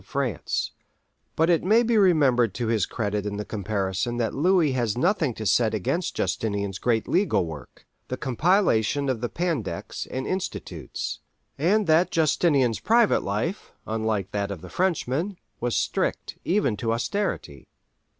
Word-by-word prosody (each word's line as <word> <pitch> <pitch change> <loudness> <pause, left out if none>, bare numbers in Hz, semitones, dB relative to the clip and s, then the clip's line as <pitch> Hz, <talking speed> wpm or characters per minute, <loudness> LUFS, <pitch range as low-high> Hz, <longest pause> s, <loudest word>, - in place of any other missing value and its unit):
of 95 - -24
France; 130 - -2 0.6
but 160 - +3
it 170 -2 +3
may 220 +6 +4
be 235 0 +1
remembered 140 - +4
to 120 - -2
his 110 -4 +1
credit 105 -2 -2
in 100 0 -4
the 105 - -4
comparison 100 +2 -2
that 115 -3 -1
Louis 170 0 +3
has 120 -4 -1
nothing 160 - +1
to 110 - -6
set 110 +2 +3
against 165 - -1
Justinian's 100 -3 -2
great 115 -3 +1
legal 180 - +2
work—the 80 - -9
compilation 140 - +2
of 125 -4 -1
the 120 - -1
Pandects 150 - -3
and 130 +1 -4
Institutes, 190 0 -4 0.4
and 200 +8 +2
that 165 +2 +4
Justinian's 145 -6 +2
private 230 -1 +3
life, 110 - -3
unlike 110 -3 -1
that 100 -1 -2
of 100 -5 -6
the - - -10
Frenchman, 180 0 -1 0.2
was 120 0 -1
strict - - -1
even 180 - +1
to 115 +1 0
austerity. 115 - -3
125 Hz, 150 wpm, -25 LUFS, 105-170 Hz, 0.6 s, may